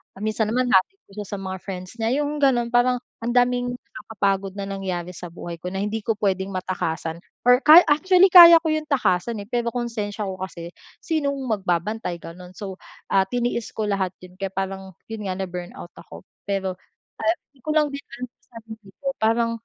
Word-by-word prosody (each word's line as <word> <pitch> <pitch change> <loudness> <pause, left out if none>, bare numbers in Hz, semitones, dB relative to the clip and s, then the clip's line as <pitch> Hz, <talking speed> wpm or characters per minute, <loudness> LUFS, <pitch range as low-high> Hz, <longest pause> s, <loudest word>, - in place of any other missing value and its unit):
Kung 200 - -6
minsan 215 0 0
naman 250 +2 +1
hinahatid 245 - +2
ko - - -22
siya 205 - -8
sa 205 - -5
mga 190 0 -4
friends 185 -2 -7
niya, 225 - +1
'yung 295 0 -3
gano'n, 245 -4 +3
parang 250 +1 +4 0.3
ang 240 - -1
daming 245 0 +2
nakakapagod 200 -6 -3
na 200 - -3
nangyari 185 -3 -4
sa 175 0 -8
buhay 170 0 -7
ko 180 - -4
na 190 - -2
hindi 215 +2 -2
ko 225 -3 -1
puwedeng 195 -1 -1
matakasan 170 -3 -3 0.3
or 250 +2 +6
ka 315 +3 +10
actually 365 +5 +5
kaya 340 -2 +11
ko 325 - -3
'yung 310 0 -2
takasan 230 -5 +1
eh 200 - -10
pero 240 -1 0
konsensya 220 -4 -3
ko 190 -1 -6
kasi 170 -2 -7 0.3
sinong 285 -4 -1 0.2
magbabantay, 180 +1 -2
gano'n. 180 +2 -10
So, 195 -2 -6 0.4
ah, 195 -1 +5
tiniis 240 +2 -2
ko 215 - -2
lahat 190 -3 0
'yun, 180 0 -13
kaya 195 -1 -4
parang 190 0 -4
'yun 220 -1 -6
nga 185 - -2
na 190 - -2
burnout 175 0 -8
ako, 85 +2 -13 0.2
pero, 195 -2 -2 0.5
ah, 335 +2 +2
hindi 275 - -28
ko - - -6
lang 305 -1 +3
din 280 - -6
alam 250 +1 -6
sa - - -45 0.2
sarili 220 -2 -12
ko, 280 - -6
parang 230 +1 +2
210 Hz, 200 wpm, -23 LUFS, 190-245 Hz, 0.5 s, kaya